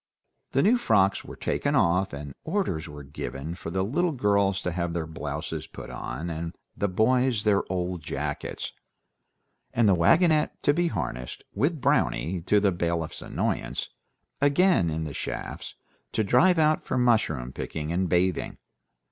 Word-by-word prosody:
The 135 - +3
new 240 +5 +4
frocks 100 - +3
were - - -9
taken - - -1
off, 90 +3 +3
and 70 -1 -7
orders 160 - -1
were 75 -1 -9
given 70 +2 -5
for 85 -1 -7
the 95 +2 0
little 160 - +1
girls 100 -5 +2
to 90 - -1
have 85 0 -2
their 85 -1 -2
blouses 80 0 -5
put - - -9
on, 65 +8 -5
and 80 0 -4 0.2
the 100 - 0
boys 120 +3 +2
their 100 -2 +3
old 90 -1 -2
jackets, 70 0 -4 1.0
and 115 -2 +4
the 100 - +6
wagonette 155 - +4
to 145 - +4
be 175 +3 +2
harnessed; 60 - -4
with 155 +3 0
Brownie, 90 -5 +1
to 105 - +5
the 100 -1 +3
bailiff's 85 -2 -2
annoyance, - - -2 0.5
again 145 - +4
in 80 0 -2
the 75 -2 -5
shafts, - - -5 0.4
to 110 - +1
drive 165 - +4
out 155 -1 +3
for - - -2
mushroom 105 - +2
picking 75 0 -4
and 90 +1 0
bathing. 90 0 +1
95 Hz, 155 wpm, -27 LUFS, 80-125 Hz, 1.0 s, the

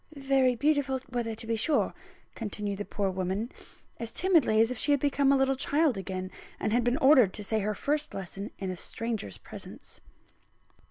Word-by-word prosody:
"Very 270 -2 +2
beautiful 285 0 +1
weather 235 -3 -2
to 225 - -11
be 225 0 0
sure," 275 +7 +1 0.4
continued 205 -2 -4
the 205 - -3
poor 200 -2 -1
woman, 190 +5 -2 0.5
as 230 -1 -5
timidly 330 -12 +3
as 225 +2 +4
if 255 - -3
she - - +2
had 285 - +4
become 280 0 +2
a 275 - +5
little 270 0 +2
child 285 +1 +2
again, 185 -1 -5 0.3
and 215 - -1
had 240 +1 +3
been 245 +2 +1
ordered 260 -8 +6
to 210 - -4
say 220 +2 0
her 210 +1 -1
first 300 +4 -1
lesson 195 +2 -6
in 190 -1 -3
a - - -4
stranger's 220 - -4
presence. - - -11
230 Hz, 185 wpm, -29 LUFS, 205-275 Hz, 0.5 s, ordered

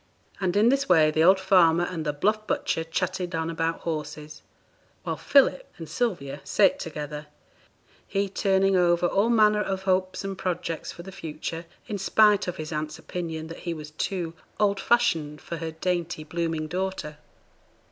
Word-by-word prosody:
And 190 0 0
in 220 +3 +5
this 275 -2 +1
way 155 -3 +5
the 160 +1 +2
old 190 +3 +6
farmer 175 -3 +4
and 175 -2 -3
the - - +2
bluff 215 +8 0
butcher 165 - -1
chatted 175 +2 -2
on 160 0 -1
about 165 0 -2
horses, 155 -2 -5 0.6
while - - -2
Philip 285 - +3
and 165 - -8
Sylvia 150 - -2
sate 280 +1 +3
together, 150 -2 -6 0.8
he 200 0 0
turning 195 0 +2
over 175 -1 +3
all 200 +5 +2
manner 215 -2 +4
of 190 -2 -3
hopes 185 0 0
and 195 0 -4
projects 175 -3 -3
for 170 - -10
the 190 - -9
future, 165 -1 -6 0.2
in 210 -4 -4
spite 210 +1 +4
of 180 - -3
his 155 0 -6
aunt's 155 0 -3
opinion 160 -3 -5
that 165 +1 -9
he 170 - -2
was 150 -1 -9
too 170 +1 -3 0.3
'old 200 -2 +2
fashioned' 165 -12 +1
for 170 - -6
her 165 0 -4
dainty, 170 0 -2
blooming 165 0 -2
daughter. 180 -4 -4
175 Hz, 165 wpm, -26 LUFS, 160-195 Hz, 0.8 s, old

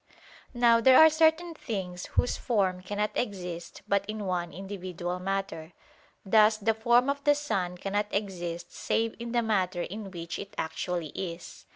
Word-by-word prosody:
Now 235 -1 +5
there 260 +2 +7
are 315 0 +9
certain 320 +2 +3
things 185 - -5
whose 245 - +2
form 190 -6 0
cannot 205 +3 -2
exist 180 -6 -4
but 200 0 +2
in 215 -1 -4
one 175 -2 -2
individual 180 -2 -5
matter: 185 -3 -3 0.5
thus 215 +2 +5
the 220 +1 +1
form 235 +3 +3
of 280 0 -1
the 290 0 +5
sun 190 -12 -2
cannot 205 +3 -1
exist 175 -4 -4
save 225 0 -1
in 235 0 -5
the 240 -1 +1
matter 185 -5 0
in 205 +1 -6
which 170 -2 -6
it 200 - -8
actually 165 0 -3
is. 170 0 -7
200 Hz, 160 wpm, -28 LUFS, 180-230 Hz, 0.5 s, are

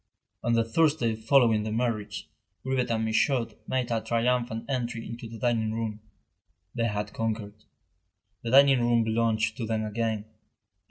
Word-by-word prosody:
On 120 - +1
the 115 0 +3
Thursday 120 -1 +2
following 115 -1 +3
the 110 0 -3
marriage, 110 -3 -2 0.4
Grivet 130 -2 0
and 110 -1 0
Michaud 115 +2 +1 0.2
made 125 -2 -1
a 115 -1 +1
triumphant 115 0 0
entry 120 -4 -3
into 115 0 -7
the 115 - -8
dining 110 -1 0
room. 110 -2 -3 0.7
They 115 -2 0
had 105 -1 -3
conquered. 105 -2 -4 0.8
The 115 - -4
dining 135 +1 +6
room 120 -1 +3
belonged 110 0 +1
to 110 +2 -1
them 110 -1 -1
again. 110 -1 -2
115 Hz, 150 wpm, -27 LUFS, 110-120 Hz, 0.8 s, dining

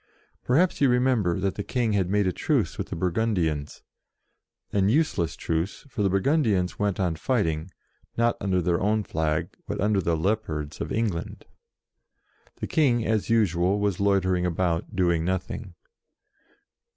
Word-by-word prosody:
Perhaps 160 +8 +2
you 140 - +5
remember 125 -8 +2
that 95 0 0
the 100 - -4
King 120 -2 0
had 95 -3 +1
made 100 0 +2
a 95 - +2
truce - - 0
with - - -4
the - - -5
Burgundians 85 -5 -1 0.9
an 100 -1 +3
useless 115 - +1
truce, 80 - -3
for 120 -4 -4
the 100 - +3
Burgundians 100 - +1
went 100 -2 0
on 90 -4 0
fighting, 80 -6 -1 0.5
not 115 0 +2
under 90 -2 +1
their 85 0 +1
own 105 +2 +1
flag, 80 -4 -1 0.2
but - - -4
under 105 0 +2
the 85 -2 0
Leopards 80 -5 -2
of - - -4
England. 105 -7 -2 1.1
The - - -5
King, 125 -7 +2
as 110 -1 0
usual, 100 -3 +2
was 100 -3 0
loitering 95 -3 +2
about, 90 +2 -1
doing 85 -3 +2
nothing. 95 +1 -3
95 Hz, 150 wpm, -26 LUFS, 85-110 Hz, 1.1 s, you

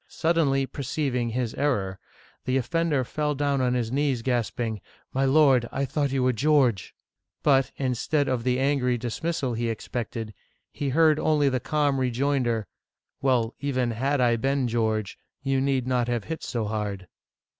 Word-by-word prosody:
Suddenly 155 -5 +1
perceiving 130 -3 -2
his 120 0 -2
error, 100 -10 -1 0.5
the 130 +1 +1
offender 145 +2 0
fell 150 +3 -2
down 140 -1 0
on 125 -1 +1
his 120 -2 -1
knees, 135 -3 0
gasping, 115 -3 -1 0.3
My 135 +1 +1
lord, 135 -4 +4
I 140 +1 -1
thought 140 +1 -1
you 135 -1 +1
were 130 0 +3
George! 130 - +2 0.2
" - - -56
But, 135 -2 +3
instead 140 +3 0
of 125 -3 -1
the 125 0 +1
angry 135 -3 +1
dis 120 -1 -4
mi^al 160 -7 -1
he 115 0 -1
expected, 115 -1 -4 0.4
he 145 - -3
heard 155 +2 +4
only 150 -3 +3
the 130 -1 0
calm 145 0 0
rejoinder, 125 -3 0 0.3
" - - -57
Well, 125 -4 +2
even 130 -4 0
had 135 +5 0
I 120 -2 +3
been 135 +1 0
George, 110 -3 -1 0.2
you 135 -1 +1
need 135 -2 +1
not 125 -2 +1
have 120 -3 -1
hit 160 0 -5
so 115 -4 -2
hard 105 -3 -3
130 Hz, 165 wpm, -26 LUFS, 120-140 Hz, 0.5 s, lord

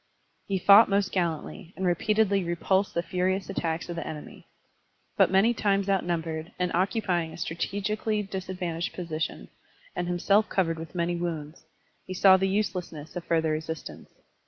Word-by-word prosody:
He 195 - 0
fought 200 +4 +7
most 200 -1 +1
gallantly, 175 +1 -3
and 190 - -2
repeatedly 200 +2 +2
repulsed 190 +3 0
the 170 - +1
furious 185 +2 -1
attacks 165 -3 -2
of 175 - -5
the 170 - -5
enemy. 150 -1 -9 0.7
But - - +5
many 195 +5 +4
times 200 -3 +1
outnumbered, 165 -4 -1
and 180 -1 -1
occupying 180 -3 0
a - - -9
strategically 210 +5 -2
disadvantageous 180 -3 -4
posi 165 -3 -5
tion, - - -3 0.5
and 175 0 -2
himself 195 +4 +2
covered 165 -4 0
with 165 +2 -9
many 175 0 0
wounds, 160 -3 -5 0.4
he 185 - -7
saw 190 +1 +7
the 190 0 +1
uselessness 180 -6 -3
of 175 - -5
further 160 -1 +1
resistance. 160 +1 -5
180 Hz, 155 wpm, -27 LUFS, 165-195 Hz, 0.7 s, fought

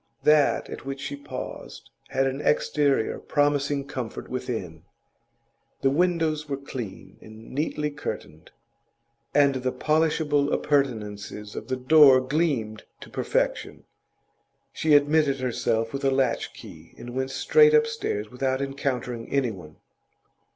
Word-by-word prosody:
That 150 -1 +4
at - - -8
which 135 0 -5
she 140 - -5
paused 140 - -8 0.2
had 135 0 +1
an 135 +1 -2
exterior 145 -5 +1
promising 145 -1 0
comfort 130 -5 -6
within; - - -4 1.0
the 135 - +3
windows 160 -2 +1
were 140 - -1
clean 110 -9 -8
and 110 +1 -13
neatly 150 +1 -2
curtained, 80 - -7 0.9
and 140 -1 +5
the 130 -1 -2
polishable 150 0 +1
appurtenances 105 -7 -1
of - - -6
the 130 - -2
door 135 0 +7
gleamed 130 -6 -1 0.2
to - - -11
perfection. - - -1 0.9
She 155 -2 +3
admitted 145 -1 +3
herself 115 -3 -1
with 140 - -4
a 135 - +3
latch 130 -3 0
key, 85 -7 -13
and 120 - -8
went 130 +1 -2
straight 450 - +5
upstairs 455 - 0
without 130 +1 -1
encountering 130 -4 -3
anyone. 105 - -2
135 Hz, 125 wpm, -25 LUFS, 120-145 Hz, 1.0 s, door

